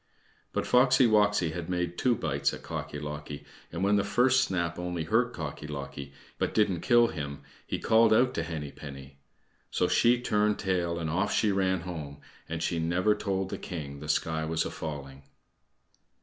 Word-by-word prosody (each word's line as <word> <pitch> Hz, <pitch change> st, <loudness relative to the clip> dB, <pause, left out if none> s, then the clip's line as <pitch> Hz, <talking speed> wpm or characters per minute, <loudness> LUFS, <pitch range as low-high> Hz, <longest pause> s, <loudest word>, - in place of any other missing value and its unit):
But -, -, -1 dB
Foxy 125 Hz, +1 st, +5 dB
woxy 105 Hz, -7 st, +3 dB
had 85 Hz, 0 st, -5 dB
made 90 Hz, -1 st, -1 dB
two 125 Hz, +5 st, +2 dB
bites 70 Hz, -8 st, -1 dB
at -, -, -13 dB
Cocky 75 Hz, -, -5 dB
locky, 75 Hz, 0 st, -6 dB, 0.3 s
and 85 Hz, +3 st, -3 dB
when 100 Hz, +1 st, +4 dB
the 100 Hz, -, +2 dB
first 125 Hz, +6 st, +3 dB
snap 85 Hz, -5 st, -2 dB
only 90 Hz, -2 st, -3 dB
hurt 115 Hz, +9 st, +2 dB
Cocky 75 Hz, -5 st, -6 dB
locky, 70 Hz, -1 st, -6 dB, 0.3 s
but -, -, -1 dB
didn't 100 Hz, -5 st, +2 dB
kill 120 Hz, -1 st, +5 dB
him, 70 Hz, -2 st, -6 dB, 0.2 s
he -, -, -2 dB
called 115 Hz, +1 st, +4 dB
out 125 Hz, +4 st, +4 dB
to -, -, -1 dB
Henny 80 Hz, -4 st, -5 dB
penny. 70 Hz, -1 st, -10 dB, 0.5 s
So -, -, +1 dB
she 120 Hz, +1 st, +4 dB
turned 105 Hz, -3 st, +1 dB
tail 90 Hz, -3 st, -1 dB
and 85 Hz, -2 st, -3 dB
off 85 Hz, +4 st, 0 dB
she 105 Hz, -, +2 dB
ran 95 Hz, -2 st, +1 dB
home, 80 Hz, -5 st, -7 dB, 0.3 s
and 80 Hz, 0 st, -3 dB
she 85 Hz, -1 st, 0 dB
never 90 Hz, +5 st, +2 dB
told 95 Hz, -2 st, -2 dB
the -, -, -5 dB
king 70 Hz, -6 st, -6 dB
the 75 Hz, +1 st, -8 dB
sky 80 Hz, +1 st, 0 dB
was 80 Hz, +1 st, -1 dB
a -, -, -4 dB
falling. 70 Hz, -3 st, -6 dB
85 Hz, 180 wpm, -29 LUFS, 75-105 Hz, 0.5 s, Foxy